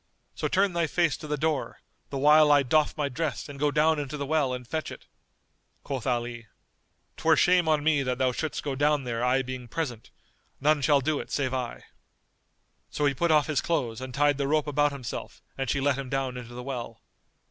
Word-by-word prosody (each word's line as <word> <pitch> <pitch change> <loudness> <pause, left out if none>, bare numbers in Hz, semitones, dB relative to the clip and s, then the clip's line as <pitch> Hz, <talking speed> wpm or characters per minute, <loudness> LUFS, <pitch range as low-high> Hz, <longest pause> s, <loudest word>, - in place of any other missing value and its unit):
So - - -2
turn 195 0 +2
thy 170 -1 +1
face 170 -1 +1
to 155 - -9
the 150 0 -1
door, 155 0 -2 0.3
the 140 - -4
while 150 +2 +6
I 145 -1 +5
doff 150 +5 +2
my 150 -2 0
dress 140 -5 -3
and 140 -1 -9
go 150 +1 +2
down 155 +1 +2
into 145 0 -4
the 140 - -3
well 145 -2 +1
and 125 -1 -5
fetch 155 +3 -3
it." - - -11 0.8
Quoth 135 -3 -4
Ali, 120 -2 -2 0.7
"'Twere - - +4
shame 180 -2 +4
on 155 -2 +2
me 155 -2 +3
that 125 -2 -1
thou 130 -1 +2
shouldst 155 +4 -3
go 140 - -2
down 145 +1 +2
there 120 -1 -3
I 130 +2 +2
being 130 -1 -6
present; 120 -4 -4 0.5
none 150 +1 +3
shall 145 -1 +4
do 150 +2 0
it - - -7
save 130 -3 -1
I." 125 -2 -4 1.1
So 150 - -1
he 140 - +3
put 170 +6 0
off 150 -2 +4
his 155 -3 0
clothes 120 -9 -1
and 130 0 -6
tied 145 +1 +2
the 140 - 0
rope 155 +1 +2
about 145 0 +2
himself 130 -4 -7
and 135 -2 -3
she 135 - +1
let 135 0 +1
him 135 -2 -5
down 135 -2 -2
into 120 -1 -8
the 125 - -6
well. 120 -3 -6
140 Hz, 215 wpm, -27 LUFS, 130-150 Hz, 1.1 s, while